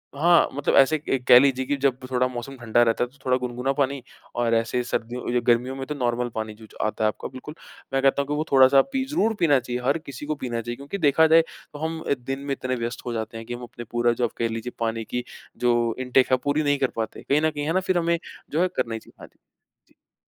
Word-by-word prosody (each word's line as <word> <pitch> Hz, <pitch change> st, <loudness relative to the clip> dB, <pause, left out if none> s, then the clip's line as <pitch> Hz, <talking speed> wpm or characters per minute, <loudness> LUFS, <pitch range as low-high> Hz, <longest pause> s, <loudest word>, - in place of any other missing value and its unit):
हाँ, 170 Hz, +4 st, +5 dB
मतलब 145 Hz, +1 st, 0 dB
ऐसे 140 Hz, +3 st, +5 dB
क -, -, -12 dB
एक 130 Hz, -2 st, 0 dB
कह 125 Hz, -, +10 dB
लीजिए 130 Hz, -1 st, +2 dB
कि 145 Hz, -, 0 dB
जब 135 Hz, -2 st, +3 dB
थोड़ा 125 Hz, 0 st, +2 dB
मौसम 125 Hz, +2 st, -7 dB
ठंडा 120 Hz, -1 st, +2 dB
रहता 115 Hz, 0 st, +1 dB
है, 125 Hz, -, -3 dB
तो 140 Hz, -, -24 dB
थोड़ा 130 Hz, 0 st, +3 dB
गुनगुना 125 Hz, +1 st, -2 dB
पानी। 140 Hz, -1 st, 0 dB, 0.3 s
और 120 Hz, -1 st, +1 dB
ऐसे 115 Hz, +2 st, 0 dB
सर्दियों 120 Hz, +1 st, -2 dB
गर्मियों 125 Hz, +2 st, +2 dB
में 135 Hz, 0 st, -5 dB
तो 150 Hz, -, -4 dB
नॉर्मल 120 Hz, -2 st, -1 dB
पानी 110 Hz, -1 st, -4 dB, 0.3 s
आता 110 Hz, 0 st, -1 dB
है -, -, +4 dB
आपका 105 Hz, -, -3 dB
बिल्कुल। 135 Hz, +4 st, -10 dB, 0.4 s
मैं 135 Hz, -, +2 dB
कहता 135 Hz, +1 st, +3 dB
हूँ 140 Hz, -, -5 dB
कि 145 Hz, -, -2 dB
वो 150 Hz, +1 st, 0 dB
थोड़ा 130 Hz, -1 st, +8 dB
सा 135 Hz, 0 st, +6 dB
पी 265 Hz, -1 st, 0 dB
ज़रूर 225 Hz, -7 st, +1 dB
पीना 145 Hz, -5 st, +4 dB
चाहिए। 125 Hz, 0 st, -4 dB
हर 140 Hz, +4 st, +2 dB
किसी 140 Hz, -3 st, -9 dB
को 155 Hz, +1 st, -2 dB
पीना 120 Hz, -4 st, -3 dB
चाहिए, 120 Hz, +1 st, -5 dB
क्योंकि 140 Hz, +9 st, -6 dB
देखा 160 Hz, -1 st, +4 dB
जाए 165 Hz, +1 st, +7 dB, 0.3 s
तो 145 Hz, -, -8 dB
हम 160 Hz, 0 st, -4 dB, 0.2 s
दिन 135 Hz, +1 st, -3 dB
में 140 Hz, 0 st, -5 dB
इतने 130 Hz, -1 st, -3 dB
व्यस्त 120 Hz, 0 st, -4 dB
हो 120 Hz, -, -3 dB
जाते 115 Hz, 0 st, -4 dB
हैं 115 Hz, -, -8 dB
कि 120 Hz, -, -6 dB
हम 120 Hz, +1 st, -7 dB
अपनी 120 Hz, 0 st, -9 dB
पूरी 120 Hz, 0 st, +2 dB
जो 120 Hz, +1 st, +1 dB
कह 115 Hz, -, +1 dB
लीजिए 115 Hz, +2 st, -4 dB
पानी 115 Hz, 0 st, -1 dB
की 125 Hz, +2 st, -3 dB, 0.3 s
जो 120 Hz, -2 st, +1 dB
इनटेक 130 Hz, 0 st, +2 dB
है, 130 Hz, -, +5 dB
पूरी 145 Hz, +4 st, 0 dB
नहीं 145 Hz, -1 st, +2 dB
कर 135 Hz, -, +2 dB
पाते। 110 Hz, -1 st, -4 dB
कहीं 145 Hz, +2 st, +4 dB
न 160 Hz, -, +3 dB
कहीं 145 Hz, -1 st, -4 dB
है 160 Hz, -, 0 dB
ना, 185 Hz, -, +3 dB
फिर 185 Hz, -1 st, 0 dB
हमें 170 Hz, 0 st, +1 dB, 0.3 s
जो 160 Hz, +4 st, +1 dB
है 185 Hz, -, +4 dB
करना 115 Hz, -, -1 dB
ही 110 Hz, -, -3 dB
चाहिए। -, -, -20 dB
हाँ -, -, -10 dB
जी। -, -, -31 dB, 0.6 s
जी। -, -, -55 dB
130 Hz, 265 wpm, -24 LUFS, 120-145 Hz, 0.6 s, कह